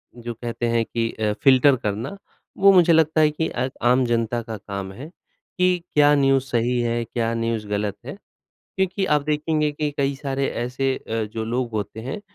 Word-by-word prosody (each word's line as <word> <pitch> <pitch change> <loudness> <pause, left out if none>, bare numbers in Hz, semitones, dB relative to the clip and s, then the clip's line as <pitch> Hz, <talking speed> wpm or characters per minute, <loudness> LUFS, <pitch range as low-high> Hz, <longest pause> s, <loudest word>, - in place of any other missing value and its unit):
जो 120 0 -6
कहते 120 +1 -4
हैं 115 0 +1
कि 115 0 -2
अ, 105 -1 -1
फिल्टर 135 0 +6
करना 115 - -4 0.4
वो 195 0 +7
मुझे 175 -2 +5
लगता 160 0 +3
है 155 - +5
कि 160 +2 -2
अ, 125 +2 -2
आम 125 +1 +3
जनता 120 0 0
का 115 -1 -7
काम 100 -2 -6
है, 140 +9 -9 0.5
कि 180 0 +3 0.2
क्या 145 0 +5
न्यूज़ 135 -2 +3
सही 120 0 0
है, 120 0 -1
क्या 115 0 -2
न्यूज़ 115 -2 -2
गलत 105 -1 -2
है। 140 +8 -7 0.6
क्योंकि 190 +1 0
आप 150 -4 +2
देखेंगे 150 0 0
कि 150 0 -2
कई 140 0 0
सारे 135 0 -2 0.2
ऐसे 130 +2 -1
अ, 115 0 -3
जो 110 -1 -3
लोग 120 +1 -2
होते 110 0 -4
हैं 135 - -5
125 Hz, 190 wpm, -23 LUFS, 115-150 Hz, 0.6 s, वो